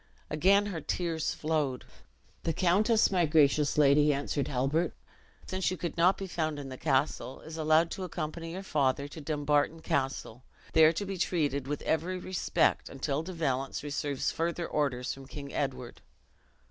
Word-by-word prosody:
And 150 - -2
again 200 +4 +5
her 180 -6 -4
tears 165 0 -2
flowed. 150 -5 -1 0.6
"The 165 - -1
countess, 205 +7 +3
my 175 -4 +2
gracious 150 -1 +3
lady," 150 +1 +5
answered 140 0 -1
Halbert, 140 +6 0 0.5
"since 185 0 -1
you 185 - -3
could 170 0 -4
not 175 +3 +4
be 195 - -4
found 155 -4 -2
in 140 -2 -6
the 130 - -6
castle, 135 -2 0
is 160 0 -9
allowed 160 +1 +3
to 190 - -4
accompany 165 -1 -5
your 190 +2 -5
father 140 -5 +1
to 155 +2 -9
Dumbarton 150 +1 0
Castle, 130 -3 -2 0.3
there 160 0 +7
to 200 +5 -3
be 195 -1 -5
treated 145 -7 0
with 145 0 -3
every 170 +4 0
respect, 185 0 0
until 140 +2 -2
De 175 +3 -7
Valence 135 -5 -2
receives 145 -1 -2
further 170 +1 -2
orders 125 -4 -1
from 135 0 -11
King 140 0 -8
Edward." 130 -4 -3
155 Hz, 165 wpm, -30 LUFS, 140-170 Hz, 0.6 s, there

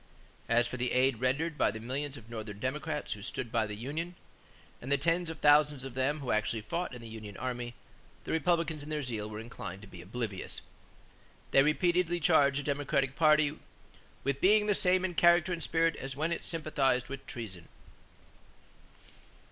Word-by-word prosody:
As 120 +1 +4
for 125 +2 -4
the 125 0 -1
aid 130 -2 +3
rendered 150 +5 0
by - - +4
the 110 +2 -5
millions 135 +5 -3
of 115 - -13
Northern 110 -3 -6
Democrats 150 +6 -2
who 105 - -10
stood 110 +2 -4
by 115 -2 +1
the 105 - -5
union 155 +10 -4 0.7
and 130 - -6
the 140 - +4
tens 165 +4 +1
of 160 - -6
thousands 145 -2 +4
of 135 -2 -7
them 135 +4 0
who 130 - -2
actually 110 +1 0
fought 170 +5 -3
in 120 - -10
the - - -8
union 110 -3 -8
army, 120 -2 -4 0.5
the - - -5
Republicans 165 -1 +1
in 145 - -8
their 150 -1 -2
zeal 110 -4 -4
were 105 - -6
inclined 105 -4 -7
to - - -11
be 90 -2 -11
oblivious. 105 +1 -4 0.9
They 135 - +7
repeatedly 175 +4 +2
charged 145 -4 +4
the - - -10
Democratic 140 -1 0
party 155 -1 +4 0.6
"with 140 0 -1
being 210 +2 +5
the 210 - +3
same 185 -1 +3
in 180 - -2
character 175 +1 +5
and 170 - -4
spirit 165 0 +2
as 135 -1 -6
when 155 +4 -1
it 170 - -2
sympathized 140 -6 0
with 135 0 -8
treason." 95 -8 -6
140 Hz, 185 wpm, -31 LUFS, 120-160 Hz, 0.9 s, They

